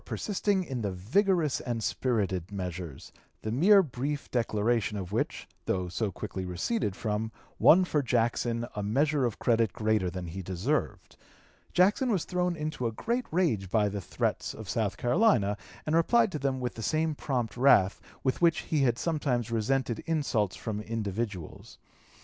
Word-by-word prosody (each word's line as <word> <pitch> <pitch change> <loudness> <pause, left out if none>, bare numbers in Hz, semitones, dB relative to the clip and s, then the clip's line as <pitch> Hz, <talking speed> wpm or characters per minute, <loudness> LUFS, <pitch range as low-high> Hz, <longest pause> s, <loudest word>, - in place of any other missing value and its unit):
236) 205 - -4
persisting 195 -1 +2
in 130 -7 -4
the 100 -2 -1
vigorous 155 - +1
and 120 -3 -3
spirited 100 -8 -1
measures, 90 -6 -6 0.3
the 110 - -2
mere 190 - +6
brief 140 0 -4
declaration 115 -2 0
of 95 -2 -5
which, 110 - -2 0.2
though 90 -1 0
so 100 +4 -2
quickly 95 +1 -5
receded 95 - -1
from, 110 +1 -2 0.3
won 185 +3 +7
for 150 -4 +1
Jackson 120 -1 0
a 105 - -2
measure 140 +7 +1
of 120 - -2
credit 115 -3 +2
greater 110 -5 +1
than 90 0 -5
he 85 +3 -6
deserved. 95 - -2 0.5
Jackson 205 +8 +3
was 190 -6 0
thrown 180 -1 0
into 150 -5 -2
a - - -2
great 235 - -2
rage 130 - +1
by 105 0 +3
the 100 0 -3
threats - - -2
of 110 - -9
South 105 0 -1
Carolina, 120 - +3 0.3
and 155 - +1
replied 225 +6 +4
to 150 - -3
them 135 -1 -1
with 125 -1 -3
the 115 - -8
same 155 +7 +1
prompt 125 -7 -2
wrath 120 -7 +4 0.2
with 130 +4 0
which 170 -2 +4
he 155 -3 0
had 120 -3 +2
sometimes 130 -8 -1
resented 115 +1 0
insults 140 - 0
from 105 -2 -4
individuals. 105 -4 -4
120 Hz, 165 wpm, -29 LUFS, 105-155 Hz, 0.5 s, won